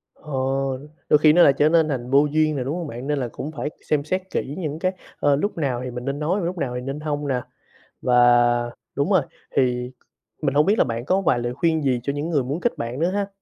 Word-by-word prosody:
Ồ. 135 -1 -2 0.3
Đôi - - +7
khi 155 -1 +6
nó 175 - +7
lại 140 - +6
trở 150 +1 +4
nên 165 -1 +4
thành 125 -3 -3
vô 140 +2 +5
duyên 155 -1 +2
nè, 130 - -1
đúng 140 +5 -2
hông 170 -3 -4
bạn? 125 +2 -7
Nên 145 -1 0
là 125 - -1
cũng 150 - -6
phải 145 0 -4 0.2
xem 150 -2 +2
xét 185 +5 -1
kỹ 140 +3 -3
những 155 -3 -4
cái, 185 +1 +1 0.3
ơ, 145 -1 +3
lúc 200 +6 -2
nào 130 -5 -1
thì 125 - -5
mình 125 +1 -6
nên 140 +1 -2
nói 170 +7 0
và 175 - -2
lúc 180 +1 -3
nào 125 -5 -2
thì 125 - -3
nên 135 +3 -5
hông 150 -1 -3
nè. 130 -3 0 0.6
Và 125 - +2 0.8
đúng 140 +7 0
rồi, 185 -5 +5 0.3
thì 125 -1 +1 0.5
mình 140 -3 0
hông 150 - +5
biết 205 +4 +3
là - - +5
bạn 115 +1 -4
có 190 +4 +2
vài 130 -9 +2
lời 120 0 -2
khuyên 160 +2 +1
gì 130 -3 +1
cho 140 - -1
những 145 +3 -3
người 145 -6 +1
muốn 140 +7 -3
kết 240 - 0
bạn 120 +4 -4
nữa 170 +2 +2
ha? 200 0 -1
145 Hz, 265 wpm, -23 LUFS, 130-160 Hz, 0.8 s, Đôi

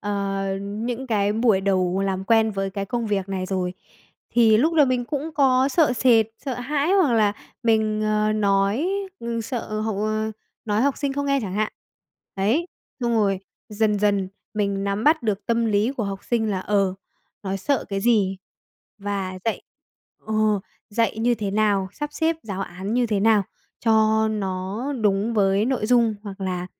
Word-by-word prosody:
ờ, 200 -1 -2
những 230 +6 -4
cái 205 -3 +1
buổi 220 -3 +3
đầu 190 -1 +1
làm 190 0 -2
quen 225 0 +3
với 195 -1 -2
cái 200 0 -3
công 235 +3 -2
việc 195 -2 -1
này 185 -1 -3
rồi. 185 -1 -2 0.6
Thì 225 -2 +5
lúc 315 +8 +2
đầu 295 -4 +5
mình 250 -1 0
cũng 290 +5 -3
có 265 -2 +4
sợ 295 -1 +3
sệt, 230 -2 +4 0.2
sợ 265 - -2
hãi 285 +7 0
hoặc 365 -11 +4
là 210 -3 +3 0.3
mình, 220 -2 +2
ờ, 215 0 +1
nói, 200 - +1 0.3
ừ, 235 0 -3
sợ 225 -2 -4
học, 215 -2 -2
ờ 215 +1 -1 0.3
nói 215 +1 +1
học 280 -1 +1
sinh 280 -2 -2
không 285 0 -2
nghe 275 0 +2
chẳng 190 -3 -4
hạn. 215 +1 0 0.6
Ấy, 220 - +1 0.3
xong 235 -1 0
rồi 200 -3 +1 0.3
dần 210 -1 +1
dần 200 -2 +1 0.3
mình 200 -1 -1
nắm 200 +3 -1
bắt 315 -1 +4
được 210 -2 -2
tâm 235 0 +1
lý 215 +3 +2
của 245 -6 -3
học 195 -1 -5
sinh 225 -3 0
là, 190 -2 -1
ờ, 195 -2 +1 0.5
nó 195 -1 -2
sợ 280 +7 0
cái 195 -1 -2
gì 200 -4 +2 0.6
và 195 -2 -3
dạy 225 - -1 0.6
ờ, 220 - -2 0.6
dạy 225 0 0
như 240 +2 +2
thế 210 -3 -3
nào, 205 -2 +1
sắp 295 +4 -5
xếp 320 +1 0
giáo 195 -3 -5
án 190 +5 -5
như 245 -1 +2
thế 210 -3 0
nào 215 -1 +4 0.4
cho 220 0 +4
nó 195 +2 -3
đúng 210 +2 +1
với 195 0 +3
nội 245 -4 0
dung, 235 -2 +3
hoặc 200 -2 -8
là 180 -2 -2
215 Hz, 180 wpm, -23 LUFS, 195-235 Hz, 0.6 s, Thì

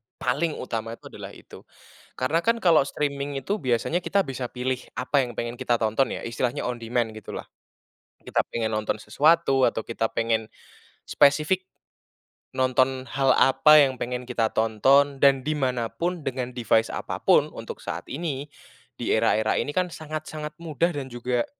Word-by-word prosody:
paling 140 +5 -1
utama 115 -2 -4
itu - - -23
adalah - - -9
itu. - - -14 0.5
Karena 145 +6 +1
kan 230 +3 +2
kalau 165 -5 +6
streaming 140 -1 -3
itu 205 +9 -2
biasanya 130 +7 0
kita 195 +2 +1
bisa 130 -4 -4
pilih 125 0 -2 0.2
apa 140 +3 +1
yang 120 -2 -9
pengen 120 +1 -4
kita 120 - +1
tonton 110 +4 +1
ya, - - -6
istilahnya 120 +1 -2
on 125 -1 -3
demand 115 0 -1
gitulah. 110 - -7 0.8
Kita - - 0
pengen 110 -1 -2
nonton 110 0 -1
sesuatu 145 -3 +3
atau 110 - -3
kita 115 0 -2
pengen 115 -1 0 0.6
spesifik, 155 +6 +3 0.9
nonton 130 0 +1
hal 135 -1 +2
apa 150 +3 +6
yang 135 -2 +1
pengen 125 0 -4
kita 115 -3 0
tonton 135 +6 +3
dan 135 -1 +6
di 155 - +1
mana 125 -4 -1
pun 175 +4 -3
dengan 125 -1 -2
device 115 -2 +1
apapun - - +2
untuk - - -7
saat - - -5
ini, 145 -2 -3 0.5
di - - 0
era-era 110 0 +2
ini 145 - -1
kan 180 +1 0
sangat-sangat 155 -1 -6
mudah 170 +1 0
dan 140 -4 -5
juga 120 0 -2
130 Hz, 160 wpm, -25 LUFS, 120-150 Hz, 0.9 s, kalau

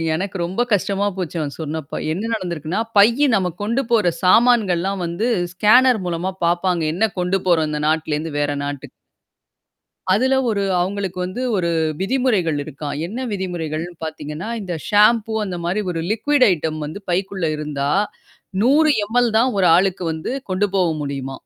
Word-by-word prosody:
எனக்கு 195 +2 -3
ரொம்ப 190 +7 -2
கஷ்டமா 200 +1 +1
போச்சு 175 -2 -4
அவன் 145 -2 -4
சொன்னப்பா. 155 -1 -5 0.2
என்ன 215 +6 -3
நடந்திருக்குன்னா, 175 -2 -3 0.2
பையி 235 +8 +5
நம்ம 180 -2 0
கொண்டு 235 +6 0
போற 210 -7 +3
சாமான்கள்லாம் 195 -4 +3
வந்து 170 +7 -2 0.3
ஸ்கேனர் 245 +4 +5
மூலமா 175 +2 -2
பாப்பாங்க. 175 0 +1
என்ன 220 +5 +1
கொண்டு 180 +2 +1
போறோம் 160 -3 +3
இந்த 150 0 -2
நாட்டுலேருந்து 155 0 -1
வேற 145 0 0
நாட்டுக்கு. 145 0 -6 1.2
அதுல 260 +6 +2
ஒரு 200 -2 0 0.2
அவங்களுக்கு 190 0 -2
வந்து 185 +8 -5 0.2
ஒரு 170 -2 0 0.3
விதிமுறைகள் 205 - +1
இருக்காம். 145 0 -6
என்ன 220 +8 -6
விதிமுறைகள்னு 175 -3 -4
பாத்தீங்கன்னா, 155 +5 -6
இந்த 180 -3 -4 0.2
ஷாம்பூ 220 +1 +4
அந்த 180 -2 -4
மாரி 190 +5 0
ஒரு 165 - -3
லிக்ய்ட் 255 +4 +3
ஐட்டம் 155 -2 -2
வந்து 155 +7 -7
பைக்குள்ள 190 -1 -1
இருந்தா, 145 -1 -2 0.7
100 300 +4 +4
எம் 230 +4 -2
எல் 235 -2 +2
தான் 250 +3 +3
ஒரு 185 -2 +4
ஆளுக்கு 190 -1 0
வந்து 160 +10 -4 0.2
கொண்டு 200 +2 +1
போவ 180 -2 +3 0.2
முடியுமா. 135 -2 -5
185 Hz, 150 wpm, -20 LUFS, 160-215 Hz, 1.2 s, பையி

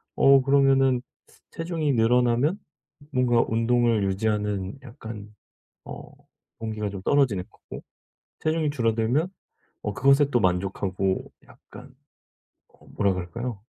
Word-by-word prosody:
어 135 0 +6
그러면은 135 -2 +3 0.5
체중이 165 -3 -2
늘어나면 125 - +2 0.5
뭔가 125 -3 +3
운동을 115 -1 +2
유지하는 105 +1 -1
약간 110 -4 -10 0.5
어 - - -9 0.5
동기가 110 -2 -4
좀 95 -1 -7
떨어지는 120 -8 +2
거고 - - -11 0.6
체중이 155 -1 0
줄어들면 120 +4 0 0.5
어 105 - -2
그것에 140 +4 +4
또 120 - +2
만족하고 95 0 -1 0.2
약간 - - -15 0.7
어 - - -24
뭐라 100 -2 0
그럴까요? 100 +5 -5
115 Hz, 260 characters per minute, -25 LUFS, 105-135 Hz, 0.7 s, 어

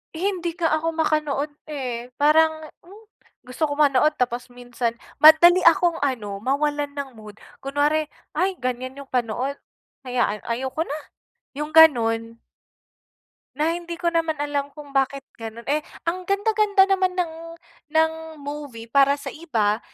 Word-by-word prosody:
Hindi 350 -2 -2
nga 335 -3 0
ako 330 +1 -2
makanood, 305 -2 0 0.2
eh. 250 -5 -5
Parang, 315 +2 +3 0.2
hmm, 405 +5 -15 0.4
gusto 255 +6 -4
ko 290 - -3
manood 300 +1 +4
tapos 245 -1 -1
minsan, 245 -1 -4 0.2
madali 315 +4 +8
akong, 345 -1 +4
ano, 220 -8 -2
mawalan 290 +4 -1
ng 280 -1 -4
mood. 215 -2 -12 0.3
Kunware, 295 +2 +1 0.3
ay 370 +4 +1
ganyan 255 +2 -4
yung 270 - -24
panood. 250 +3 -1 0.5
Hayaan, 240 -4 0
ayoko 260 +6 -2
na, 290 - -4 0.6
yung 300 +1 -4
ganun? 230 -7 +4 1.2
Na 305 +3 +1
hindi 340 0 -5
ko 345 0 -1
naman 330 -1 0
alam 290 -1 -2
kung 295 -2 -11
bakit 275 0 0 0.2
ganun? 225 +1 -8
Eh, 295 +2 +2 0.2
ang 360 +2 -3
ganda-ganda 405 0 +3
naman 375 -1 +2
ng 345 -3 -1 0.6
ng 320 0 +4 0.3
movie 280 -6 -7
para 280 +1 +5
sa 285 -1 -7
iba. 225 -10 -1
290 Hz, 140 wpm, -23 LUFS, 255-325 Hz, 1.2 s, madali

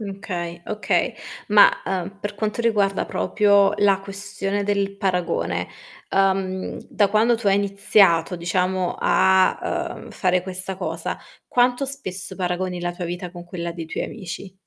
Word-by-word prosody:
Okay. 185 -4 -5
Okay. 215 0 0 0.4
Ma, 205 -1 +8 0.2
uhm, 190 +1 -3
per 205 0 -4
quanto 215 +2 -2
riguarda 205 -4 +1
proprio 200 -1 +3
la 200 -2 +4
questione 200 0 -3
del 200 -1 0
paragone, 180 -4 -1 0.4
uhm, 190 -1 0
da 205 -2 +2
quando 220 +4 +3
tu 225 -2 -6
hai 195 - +5
iniziato, 195 -3 +3
diciamo, 180 +1 0
a, 190 0 +2
uhm, - - -11
fare 180 -1 +1
questa 185 0 -5
cosa, - - -3 0.3
quanto 250 +2 +2
spesso 190 -9 -6
paragoni 180 0 -2
la 175 0 -2
tua 175 0 -5
vita 180 +1 -5
con 175 0 -10
quella 170 -1 -5
dei 165 -1 -7
tuoi - - -3
amici? 190 -2 -7
195 Hz, 145 wpm, -23 LUFS, 180-205 Hz, 0.4 s, Ma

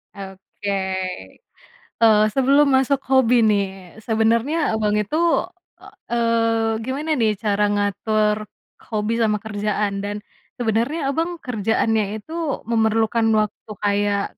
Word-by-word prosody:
Oke. 195 +1 -8 1.3
Eee, 215 -2 +6
sebelum 275 +3 +4
masuk 265 +1 +2
hobi 250 -3 +4
nih. 195 -1 -2
Sebenernya 230 +7 +1
Abang 210 -1 0
itu, 210 +8 -2 0.6
e - - -17 0.3
eee, 230 -1 +1
gimana 285 +5 -3
nih 215 -3 +1
cara 210 0 0
ngatur 210 +1 0 0.5
hobi 215 0 -1
sama 215 -2 +2
kerjaan? 205 -1 -2
Dan 205 +1 -3 0.4
sebenarnya 250 +6 -1
Abang 340 +3 -2
kerjaannya 220 -4 -1
itu 315 +10 -11 0.3
memerlukan 225 0 +1
waktu 215 +1 -4
kayak 205 0 +1
220 Hz, 110 wpm, -21 LUFS, 210-235 Hz, 1.3 s, Eee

